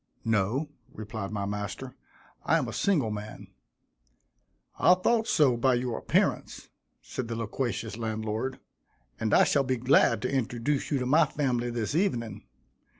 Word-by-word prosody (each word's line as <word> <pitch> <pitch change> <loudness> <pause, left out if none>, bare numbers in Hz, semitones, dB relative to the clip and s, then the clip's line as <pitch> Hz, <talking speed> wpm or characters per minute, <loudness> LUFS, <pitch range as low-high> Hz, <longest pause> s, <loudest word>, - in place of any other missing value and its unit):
"No," 115 +7 +1 0.2
replied 110 -2 -6
my 100 -1 -3
master, 105 +5 -5 0.5
"I - - +3
am - - -1
a - - -6
single 150 - +1
man." 105 0 -7 1.3
"I 180 - +6
thought 225 +5 +1
so 135 -5 +4
by 125 +2 +2
your 120 -1 -2
appearance," - - 0 0.3
said 130 - -5
the 115 - -4
loquacious 115 0 -3
landlord, 110 +3 -3 0.6
"and 110 - -1
I - - +6
shall 140 - +2
be 130 -1 -1
glad 120 -3 +3
to - - -1
introduce 125 +3 -1
you 145 - +1
to 125 - -2
my 150 +4 +4
family 125 -5 -1
this 120 +1 -2
evening. 115 - -1
120 Hz, 150 wpm, -28 LUFS, 110-135 Hz, 1.3 s, I